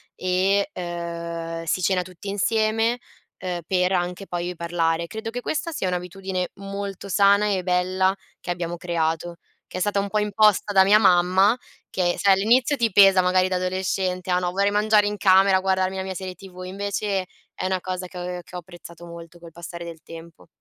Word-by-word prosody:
e, 190 +2 +1
ehm, 170 -1 -5
si 165 - 0
cena 185 0 +2
tutti 180 +2 -11
insieme, 220 +3 +1 0.4
ehm, 180 -2 -4
per 180 -1 +1
anche 180 +1 -2
poi 175 -1 -4
io 180 - -5
parlare. 170 -1 -1
Credo 220 +6 -6
che 245 +2 -5
questa 315 +5 -2
sia 195 -11 -2
un'abitudine 180 +1 -3
molto 200 0 -6
sana 200 +1 +4
e 185 - -1
bella 185 +1 +1 0.2
che - - -10
abbiamo 175 -1 -3
creato, 170 0 -2 0.3
che - - -7
è - - -3
stata 205 +1 +1
un 200 0 -2
po' 215 - -1
imposta 210 -1 +2
da 190 -1 +7
mia 205 +2 +6
mamma, 185 +2 +4 0.3
che 175 -2 0
sai 200 -1 +5
all'inizio 235 +8 +3
ti 235 -4 0
pesa 195 -1 +7
magari 185 0 +2
da 185 - -1
adolescente: 185 0 -2
"Ah 180 - +3
no 180 -1 -2
vorrei 200 +2 +1
mangiare 210 0 +3
in 210 - -3
camera 190 -1 +5
a - - 0
guardarmi 190 0 0
la 190 - -2
mia 190 0 -5
serie 185 0 -6
TV"; 185 -2 -11
invece 200 0 -2 0.3
è - - -5
una 185 0 0
cosa 185 0 -5
che 180 - -12
ho 180 0 -5
che 180 - -13
ho 180 - -3
apprezzato 175 0 -13
molto 170 0 -11
col 170 -1 -12
passare 170 +1 -8
del 165 -2 -9
tempo. 165 0 -12
185 Hz, 195 wpm, -23 LUFS, 175-200 Hz, 0.4 s, da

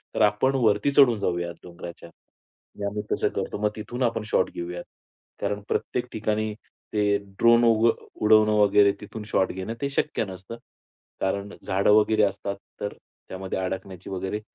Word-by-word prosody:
तर - - 0
आपण 105 +6 +3
वरती 110 +1 +3
चढून 125 -6 +5
जाऊयात 85 -2 -2
डोंगराच्या. 85 -1 -10 0.7
मग 100 - -2
आम्ही 105 +1 -3
तसं - - +1
करतो. - - -2
मग 105 - +3
तिथून 120 +4 -4
आपण 115 -2 0
शॉट - - +3
घेऊयात. 85 0 -5 0.6
कारण 105 0 -1
प्रत्येक 125 0 -1
ठिकाणी 110 0 -1 0.4
ते 105 -1 +3 0.2
ड्रोन 115 0 +6
उग 115 +1 +5 0.3
उडवणं 110 0 +5
वगैरे 100 0 +5
तिथून 105 +1 -7
शॉट 95 - +3
घेणं 95 +4 -4
ते 140 - 0
शक्य 135 -4 -1
नसतं 95 +4 -9 0.6
कारण 100 +1 -1
झाडं 95 +2 +2
वगैरे 110 0 +4
असतात. 100 0 -1 0.3
तर 105 - -3 0.4
त्यामध्ये 95 0 -4
अडकण्याची 95 0 -5
वगैरे 95 +2 -3
105 Hz, 155 wpm, -25 LUFS, 95-110 Hz, 0.7 s, ड्रोन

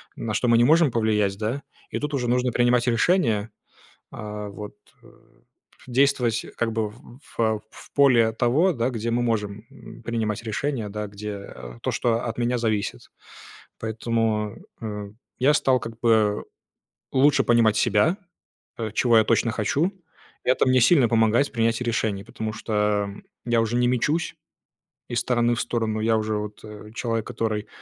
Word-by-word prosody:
на 110 -2 -4
что 120 +4 0
мы 115 -1 +5
не 120 - +5
можем 160 +2 +5
повлиять, 105 -4 +1
да. 110 +7 -3 0.3
И - - -3
тут 150 +1 -4
уже 125 -3 -1
нужно 125 0 +1
принимать 120 0 +3
решение, 115 - +2 0.6
а, 105 -1 -6
вот, 105 +1 -8 0.3
э, - - -16 0.8
действовать 125 -3 +2
как 115 -1 -1
бы 110 -1 -1
в - - -15 0.4
в 110 -2 +1
в - - -15
поле 130 -5 +5
от 110 - -7
того, 150 +11 +3
да, 120 0 0
где 115 -1 -3
мы 120 +1 +1
можем, 105 -4 -2
м, - - -13
принимать 110 -2 -2
решения, 120 0 -2
да, 105 +1 -4
где 100 0 -7 0.3
то, - - 0
что 115 -1 0
от 115 - -4
меня 120 +1 +1
зависит. 110 -3 -2 0.7
Поэтому, 110 -1 -1 0.3
э, 105 -2 -5 0.3
я 140 +4 +4
стал 130 -4 +3
как 115 0 -8
бы 110 -3 +2 0.7
лучше 140 +2 +4
понимать 115 -3 +4
себя, 105 - +3 0.6
э, 110 -2 -3
чего 120 0 +4
я 110 - +6
точно 115 +1 +2
хочу. 140 - 0 0.5
Это 130 - +3
мне 130 0 +4
сильно 130 -2 +5
помогает 115 +4 +3
в - - -25
принятии 115 0 +1
решений, 110 -4 -1
потому 110 -1 -5
что 105 -2 0 0.4
я 120 -1 +2
уже 115 +1 -1
не 125 0 +3
мечусь 145 +7 0 0.7
из 120 -1 0
стороны 120 -1 +1
в - - -1
сторону. 115 -2 -1
Я 110 +1 +2
уже 110 0 -1
вот, 105 0 -5
э, 105 0 -11
человек, 115 -3 -2
который 110 -3 -2
115 Hz, 165 wpm, -24 LUFS, 105-120 Hz, 0.8 s, я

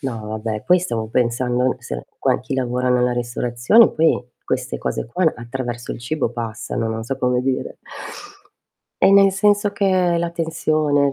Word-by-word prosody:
No, 115 -7 -5
vabbè, 110 0 -4
poi 180 +1 +5
stavo 115 -11 -3
pensando 125 +2 +1
se - - -6
quan - - +1
chi 130 +2 -5
lavora 125 -1 -1
nella 125 0 +2
ristorazione, 120 - +3
poi 160 -3 +2 0.2
queste - - -2
cose - - -3
qua, 160 +7 +1
attraverso 120 0 -5
il - - -8
cibo 130 0 -2
passano, 115 0 -4
non 110 0 -3
so 130 +4 -3
come 125 -1 +1
dire. 130 0 -2 1.3
E 195 - +6
nel 195 0 +7
senso 205 +1 +2
che 200 - -2
hai 180 -3 +2
la 170 0 -1
tensione 155 -4 +1
125 Hz, 160 wpm, -20 LUFS, 120-165 Hz, 1.3 s, nel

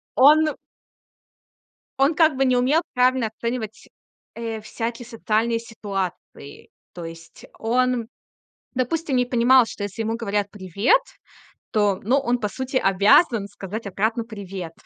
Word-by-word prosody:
Он 305 +3 +5 1.4
он 275 +4 +4
как 315 -3 +4
бы 270 - +2
не 255 -1 +3
умел 270 +7 +3
правильно 250 -2 +3
оценивать, 225 0 -5 0.5
э, 225 -1 -5
всякие 230 +2 -5
социальные 230 0 0
ситуации. 195 -10 -6 0.2
То 175 - -7
есть 165 0 -11
он, 245 0 0 0.7
допустим, 270 +3 -1
не 250 0 +2
понимал, 245 0 +5
что 210 - -8
если 205 +2 -4
ему 225 +1 -2
говорят: 205 -3 -2
"Привет", 200 - +2 0.7
то, 205 -3 +2
ну, 250 +7 +2
он, 245 -3 0
по 210 - -1
сути, 260 +6 -5
обязан 200 - +4
сказать 205 +2 -7
обратно: 220 +4 -1
"Привет". 195 -6 -7
230 Hz, 130 wpm, -23 LUFS, 205-255 Hz, 1.4 s, Он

